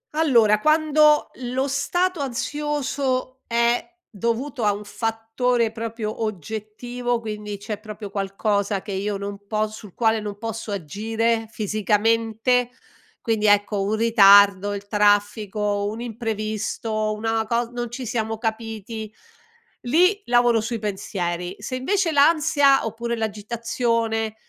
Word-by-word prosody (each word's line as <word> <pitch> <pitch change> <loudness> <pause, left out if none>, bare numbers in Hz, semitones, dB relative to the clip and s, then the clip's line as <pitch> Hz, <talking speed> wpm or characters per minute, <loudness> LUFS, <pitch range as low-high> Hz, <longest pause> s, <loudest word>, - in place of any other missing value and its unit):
Allora, 230 -9 +4
quando 305 +1 +4
lo 260 +2 -2
stato 350 +6 0
ansioso 270 -1 -2
è 235 +8 +1
dovuto 235 +4 -2
a 210 - +4
un 205 +1 -5
fattore 225 +2 -1
proprio 225 -1 -5
oggettivo, 220 +5 -3
quindi 210 -2 -6
c'è 210 +1 -6
proprio 210 -2 -8
qualcosa 200 0 -1
che 205 - -7
io 200 +1 -2
non 200 0 -7
po 215 0 0
sul 215 -3 -12
quale 225 -1 +2
non 205 -1 -6
posso 225 0 -5
agire, 225 +6 -1
fisicamente, 225 +3 +1 0.5
quindi 220 -2 +1
ecco, 205 0 +3
un 205 +3 0
ritardo, 205 -3 +6
il 200 0 -7
traffico, 205 0 +1
un 220 +2 -6
imprevisto, 215 -1 -2
una 225 0 -1
cos 235 0 0
non 240 -1 -4
ci 250 +2 -6
siamo 225 -1 -2
capiti, 220 -1 -4 0.7
lì 360 - +3
lavoro 240 -2 +3
sui 230 +2 -3
pensieri. 185 -4 -3
Se 235 +5 -5
invece 360 +7 0
l'ansia, 290 -3 +4
oppure 235 +2 -3
l'agitazione, 225 +1 -1
225 Hz, 120 wpm, -23 LUFS, 210-245 Hz, 0.7 s, ritardo